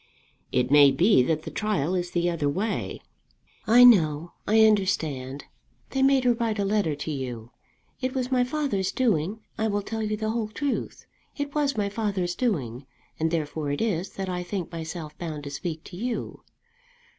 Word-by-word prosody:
"It 125 +1 +1
may 145 -1 +8
be 150 - +4
that 155 +4 0
the - - -7
trial 185 -7 -1
is 180 -1 -1
the 175 0 0
other 165 -4 0
way." 200 +8 -2 0.6
"I 240 +3 +7
know; 170 -9 +5 0.2
I 220 +1 +6
understand. 155 -10 0 0.5
They 270 - 0
made 270 -1 +4
her 245 -1 +4
write 230 -2 -1
a 200 - 0
letter 195 -7 +1
to 145 +2 -5
you. 125 -5 -5 0.5
It 255 0 -2
was 255 0 -2
my 250 -1 +3
father's 250 -8 -1
doing. 215 -4 0 0.2
I 220 - +1
will 205 -1 -1
tell 220 +2 -4
you 215 0 -1
the 215 0 -1
whole 225 -1 -1
truth. 275 +6 -3 0.3
It 285 -1 -3
was 285 -3 0
my 205 -1 +1
father's 200 -4 -1
doing, 135 - -2 0.3
and 160 +1 +1
therefore 155 -2 -2
it 145 - -1
is 195 -5 -1
that 195 -1 -4
I 180 -1 -2
think 180 -1 -4
myself 160 -2 -6
bound 155 -4 -5
to 140 - -6
speak 160 +2 -5
to 175 - -11
you. 235 +5 -4
190 Hz, 180 wpm, -26 LUFS, 155-220 Hz, 0.6 s, may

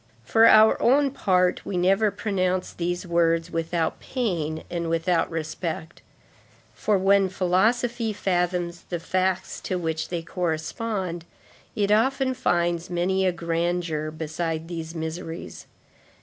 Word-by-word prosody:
For 225 - +5
our 220 0 +6
own 275 +3 +4
part, 180 -7 +1
we 185 - -3
never 195 +4 +3
pronounce 185 -3 -1
those 175 +2 -3
words 165 -1 +1
without 165 0 -1
pain 170 - -2
and 170 -1 -3
without 165 +1 +1
respect, 160 +1 -5 0.7
for 210 -2 +1
when 195 0 +3
philosophy 225 +6 +1
fathoms 180 -3 -1
the 175 - -2
facts 185 +2 -1
to 185 - -2
which 160 -2 -2
they 170 -2 -3
correspond, 175 +2 -3 0.5
it 205 -2 +1
often 260 +4 +2
finds 175 -8 0
many 185 +2 +1
a - - +3
grandeur 170 -2 -1
beside 160 +1 -4
these 165 -1 -6
miseries. 160 +1 -6
175 Hz, 120 wpm, -25 LUFS, 165-195 Hz, 0.7 s, our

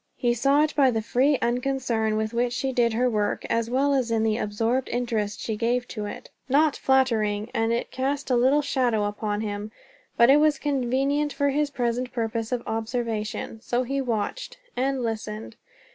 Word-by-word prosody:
He 240 -2 +1
saw 275 +5 +3
it 305 - -1
by 275 -3 +5
the 225 -3 -1
free 265 +5 +2
unconcern 240 -3 0
with 220 +1 -2
which 240 +1 0
she 265 +2 -1
did 235 -2 +2
her 245 +3 +2
work, 210 -3 -1
as 230 0 0
well 275 +3 +2
as 260 -4 +1
in 225 -1 +1
the 220 -1 +2
absorbed 225 +4 -1
interest 225 -4 -2
she 220 - -3
gave 240 +3 0
to 210 -3 -4
it. - - -9 0.2
Not 295 +2 +3
flattering, 225 -5 +1
and 225 0 +1
it 235 - -2
cast 275 +1 -2
a - - +4
little 265 +5 +3
shadow 245 -6 +1
upon 205 0 -2
him, 210 0 -4 0.5
but 235 +2 +7
it 285 - +7
was 300 0 +3
convenient 280 +1 0
for 285 0 +1
his 290 +1 +1
present 245 -2 -2
purpose 225 -1 -2
of 245 -1 -1
observation. 225 -1 -3
So 245 +1 0
he 275 +2 -2
watched, 245 - -3 0.2
and 265 0 0
listened. 220 -1 -4
240 Hz, 185 wpm, -25 LUFS, 220-270 Hz, 0.5 s, but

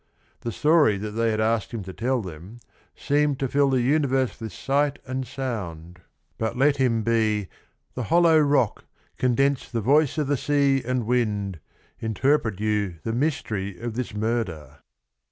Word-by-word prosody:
The 115 - -4
story 150 -7 +3
that 105 +2 -5
they 115 +1 0
had 110 -1 -1
asked 110 -1 0
him 115 -4 -5
to 95 0 -8
tell 125 +2 -1
them 90 +5 -9 0.4
"seems 145 -1 +1
to 135 - -1
fill 140 +2 +2
the 130 -2 +2
universe 135 -2 +1
with 110 -2 -5
sight 140 - 0
and 130 0 -4
sound," 90 -10 -5 0.4
but 110 +2 -2
let 140 +2 +3
him 120 -4 +1
be 110 -4 +1 0.4
"the 125 - -4
hollow 165 -1 +5
rock, 140 -6 +1 0.3
condense 135 +2 +1
The 115 - -2
voice 145 +6 +3
o' 155 - +2
the 145 0 0
sea 140 -1 +2
and 125 -1 -1
wind, 105 -6 -1 0.4
interpret 110 -1 0
you 105 -4 0
The 115 - -2
mystery 110 - -2
of 120 -1 -4
this 115 -2 -4
murder." 105 - -3
120 Hz, 160 wpm, -24 LUFS, 105-135 Hz, 0.4 s, hollow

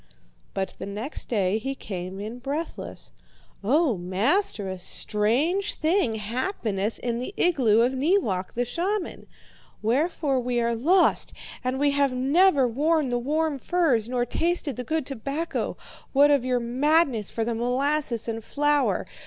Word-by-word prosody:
"But 190 -1 -2
the - - -5
next 215 +9 -5
day 205 -2 +1
he 270 +4 -4
came 185 -4 -6
in 220 +4 -6
breathless. 285 +6 -5 0.5
'O 265 - +2
master, 205 - 0
a 185 -1 -5
strange 250 - 0
thing 315 - +1
happeneth 220 - -2
in 235 -1 -1
the 255 +11 -5
igloo 250 -11 +3
of 245 +3 +2
Neewak, 260 - 0
the 245 +1 0
shaman; 365 - -3 0.6
wherefore 275 +3 +1
we 245 -1 -1
are 235 0 +1
lost, 350 +11 +3 0.3
and 255 +1 -1
we 285 0 +3
have 280 -2 +2
neither 275 +2 +4
worn 295 +4 +1
the 245 0 0
warm 300 +3 0
furs 265 -10 +1
nor 245 -1 0
tasted 330 +1 -1
the 250 - -4
good 315 +2 -1
tobacco, 275 +6 -3 0.4
what 285 +1 +6
of 280 -4 +3
your 250 -1 +1
madness 260 - +2
for 225 - -2
the 235 - -1
molasses 250 +1 0
and 225 -1 -3
flour. 295 +2 +1
255 Hz, 145 wpm, -25 LUFS, 225-305 Hz, 0.6 s, what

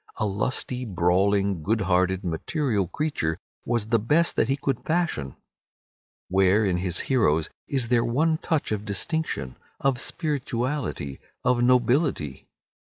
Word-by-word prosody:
A - - 0
lusty, 125 +5 -1
brawling, 95 -1 +1
good 110 +7 0
hearted, 95 +1 +1
material 100 - -1
creature 80 - -2 0.3
was 115 -2 -1
the 115 - +3
best 150 +10 +2
that - - +2
he 135 - +3
could 135 -3 -2
fashion. 160 - -1 0.9
Where, 95 +3 +3
in 90 -3 +1
his 90 -1 -2
heroes, 80 - +1 0.2
is 130 -4 -1
there 120 -2 +3
one 155 +7 +1
touch 160 -8 -1
of 105 -1 -1
distinction, 100 - -2 0.2
of 135 -2 +1
spirituality, 130 - -2 0.2
of 125 -1 +2
nobility? 125 - +2
115 Hz, 130 wpm, -25 LUFS, 95-135 Hz, 0.9 s, the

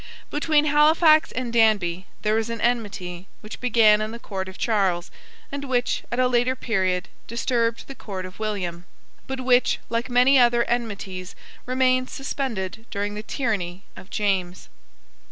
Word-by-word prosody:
Between 300 0 +2
Halifax 310 +2 +5
and 250 -2 -4
Danby 200 -6 +2 0.2
there 215 0 +2
was 225 +1 0
an 230 0 -4
enmity 200 -7 -2
which 215 - -9
began 225 -3 +5
in 215 - -2
the 230 - -7
court 190 -4 -5
of 190 - -11
Charles, 190 -6 0 0.4
and 280 0 -4
which, 250 -2 0
at 240 - -2
a 255 0 +3
later 250 +1 +2
period, 190 -7 -1 0.2
disturbed 235 0 -1
the 275 - -7
court 190 -7 -6
of 185 +2 -11
William, 180 -5 -3 0.4
but 265 -1 -4
which, 250 -1 +3
like 230 +1 -1
many 250 +2 +5
other 240 -1 +4
enmities, 200 -7 -4 0.3
remained 255 0 +2
suspended 230 -6 -4
during 205 0 -3
the 210 - -5
tyranny 205 -7 -3
of 185 - -12
James. 190 -4 -1
225 Hz, 155 wpm, -24 LUFS, 195-255 Hz, 0.4 s, Halifax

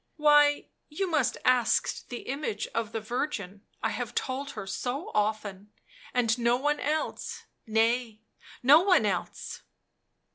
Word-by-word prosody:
why, 295 -1 +5 0.2
you 315 +6 -2
must 305 -7 +1
ask 250 -2 +2
the 245 - -5
image 270 -6 -3
of 230 -1 -2
the 225 - -2
Virgin 215 -4 -4
— - - -35
I - - +1
have - - -4
told 275 +2 -3
her - - -4
so 245 - -4
often, 210 -1 -2 0.4
and 245 -1 +1
no 235 +1 +3
one 295 +3 0
else; 305 +2 -2 0.2
nay, 225 0 +1 0.4
no 285 +5 +8
one 365 - +4
else 190 -4 -3
245 Hz, 140 wpm, -28 LUFS, 215-290 Hz, 0.4 s, no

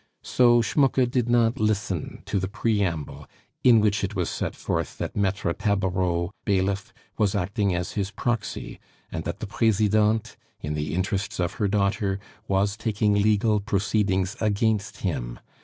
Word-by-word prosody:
So 120 -1 +4
Schmucke 135 +1 +3
did 120 -1 0
not 120 -1 +3
listen 105 -5 -1
to 100 0 -1
the 95 - -2
preamble 95 - -1 0.4
in 120 -3 +7
which 105 -1 +1
it 100 +2 -2
was 90 -3 -1
set - - -3
forth - - -3
that - - -4
Maitre 95 -3 0
Tabareau, 95 -3 0
bailiff, 100 +3 0 0.3
was 105 -2 +2
acting 100 0 0
as 90 0 -2
his 100 -2 -2
proxy, 115 +1 -3 0.3
and 80 0 -4
that 85 +5 -4
the - - -2
Presidente, 110 0 +2 0.2
in 75 0 -4
the 75 0 -2
interests 95 +2 -2
of 90 -1 0
her 105 - +3
daughter, 100 0 0 0.3
was 100 +1 +1
taking 105 -1 +1
legal 105 +1 +3
proceedings 100 -1 0
against 105 -1 0
him. - - -3
100 Hz, 150 wpm, -25 LUFS, 95-110 Hz, 0.4 s, in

